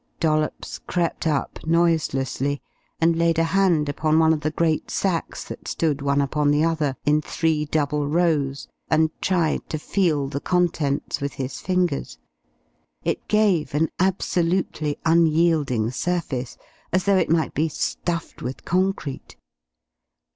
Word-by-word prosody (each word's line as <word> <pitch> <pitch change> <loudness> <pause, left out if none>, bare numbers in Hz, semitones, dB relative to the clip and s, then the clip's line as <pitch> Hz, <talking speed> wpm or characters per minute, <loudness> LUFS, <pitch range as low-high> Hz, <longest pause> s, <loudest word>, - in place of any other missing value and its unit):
Dollops 155 -2 -1
crept 170 -2 -1
up 145 -3 -1
noiselessly 150 -4 +1 0.4
and 165 0 +3
laid 165 0 +2
a 165 - +3
hand 170 -3 +2
upon 155 +2 +1
one 160 0 +5
of 155 - -2
the 155 - 0
great 160 0 0
sacks 180 -4 -1
that - - -9
stood 150 -4 0
one 140 0 +2
upon 145 +1 +1
the 145 +1 +3
other 155 -4 0
in 150 +1 +3
three 155 0 0
double 150 -1 0
rows, 150 -4 0 0.2
and 160 0 +3
tried 175 -4 0
to 155 - -2
feel 155 -4 0
the 140 0 -3
contents 165 -6 0
with 140 0 -2
his 130 0 -5
fingers. 180 - -1 0.9
It - - -2
gave 200 -9 +2
an 160 +2 +2
absolutely 175 -4 0
unyielding 160 -8 +3
surface, 135 -4 -2 0.3
as 185 +1 +2
though 200 -1 +3
it - - +1
might 160 -3 +1
be 160 +3 +1
stuffed 170 +2 -3
with 130 +2 -6
concrete. 185 -6 -1
160 Hz, 140 wpm, -23 LUFS, 145-170 Hz, 0.9 s, one